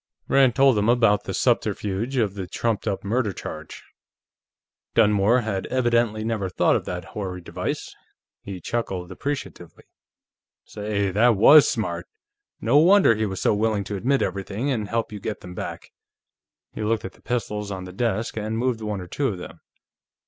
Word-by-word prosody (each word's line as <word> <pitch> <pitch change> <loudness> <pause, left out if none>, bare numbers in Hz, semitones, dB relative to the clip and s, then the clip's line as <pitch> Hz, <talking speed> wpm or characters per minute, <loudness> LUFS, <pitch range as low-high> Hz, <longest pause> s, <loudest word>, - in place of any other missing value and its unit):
Rand 135 -4 +4
told 135 -5 +5
him 105 +2 +1
about 115 -4 +3
the - - -4
subterfuge 105 +7 0
of 105 -5 +1
the 95 -3 -6
trumped 115 +3 -2
up 100 -2 -2
murder 110 +1 0
charge. - - -8 1.1
Dunmore 105 +2 +4
had 100 -4 -3
evidently 120 -3 +1
never 110 -4 -2
thought - - +2
of - - -2
that 90 -1 -5
hoary 95 -3 -4
device; 85 - -5 0.5
he 95 -2 -7
chuckled 95 -3 -3
appreciatively. 95 - -6 0.8
"Say, 105 -2 -2
that 115 +4 +4
was 145 +9 +8
smart! 85 -7 -3 0.5
No 125 +6 +4
wonder 185 - +6
he 110 0 -1
was 95 -1 -5
so - - +3
willing 105 -1 0
to 100 +2 -5
admit 130 +8 +1
everything 100 +7 -2
and 110 -5 -2
help 115 -1 -1
you 105 - -6
get 105 +1 -5
them 90 - -9
back." - - -7 0.8
He - - -6
looked 110 +1 0
at 95 - -7
the - - -23
pistols 105 -4 -3
on 95 -2 -5
the 90 0 -9
desk 115 +1 -1
and 110 +1 -2
moved 120 -1 0
one 105 -3 -3
or 90 - -8
two 140 +9 -1
of 100 - -3
them. 90 - -10
105 Hz, 170 wpm, -24 LUFS, 95-120 Hz, 1.1 s, was